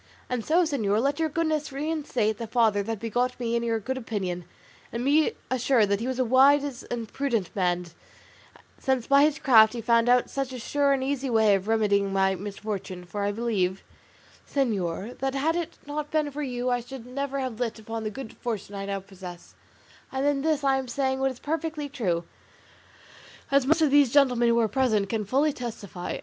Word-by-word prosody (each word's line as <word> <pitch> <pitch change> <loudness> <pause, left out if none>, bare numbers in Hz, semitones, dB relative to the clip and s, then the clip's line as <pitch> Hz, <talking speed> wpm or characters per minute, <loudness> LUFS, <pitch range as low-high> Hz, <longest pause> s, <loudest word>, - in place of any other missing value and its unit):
And 245 -3 -1
so, 335 +7 +3
señor, 220 -10 0
let 280 +5 0
your 320 -1 +1
goodness 310 -1 -1
reinstate 275 -7 -1
the 230 - -4
father 220 -3 +2
that 225 +2 -3
begot 245 +3 -1
me 235 -1 -1
in 235 - +1
your 230 -1 0
good 260 +5 -3
opinion, 185 -7 -4 0.5
and 235 +2 -3
be 300 +3 +3 0.2
assured 250 -4 +3
that 200 0 +1
he 235 - -3
was 260 -1 -2
a 255 - +1
wise 275 +2 +4
and 235 -2 -4
prudent 235 -10 -1
man, 180 -2 0 0.9
since 260 -3 0
by 280 0 +5
his 305 -1 +1
craft 220 -7 +6
he 240 - -4
found 230 +1 +3
out 245 0 +4
such 270 -1 -3
a - - -5
sure 280 +4 +1
and 270 -1 +1
easy 270 0 -1
way 220 -3 +4
of 195 +1 0
remedying 205 -3 +2
my 190 0 +2
misfortune; 195 -1 -5
for 205 +4 -5
I 200 - +1
believe, 200 -4 -1 0.7
señor, 210 - -1
that 270 0 -1
had 310 +4 +1
it 345 -2 -4
not 295 +1 -4
been 305 -2 0
for 295 +2 -5
you 250 -2 -2
I 245 - +1
should 245 0 -9
never 275 +2 -3
have 255 -4 -4
lit 235 -2 -2
upon 225 +1 -6
the 215 - -2
good 225 +2 -8
fortune 215 -4 -4
I 195 0 -5
now 195 -1 -2
possess; 185 -2 -11 0.6
and 265 +1 -1
in 285 -1 +2
this 305 -1 0
I 270 -1 +3
am 260 - -5
saying 265 +1 -1
what 270 0 +2
is 260 - -7
perfectly 315 +1 -3
true; 185 -12 -1 1.3
as 275 -1 +3
most 320 +2 +4
of 295 - +3
these 285 -4 +5
gentlemen 250 -4 +4
who 235 0 +3
are 225 - +2
present 220 -5 +1
can 220 -1 -1
fully 280 +7 +2
testify. 220 - -6
245 Hz, 200 wpm, -26 LUFS, 210-275 Hz, 1.3 s, craft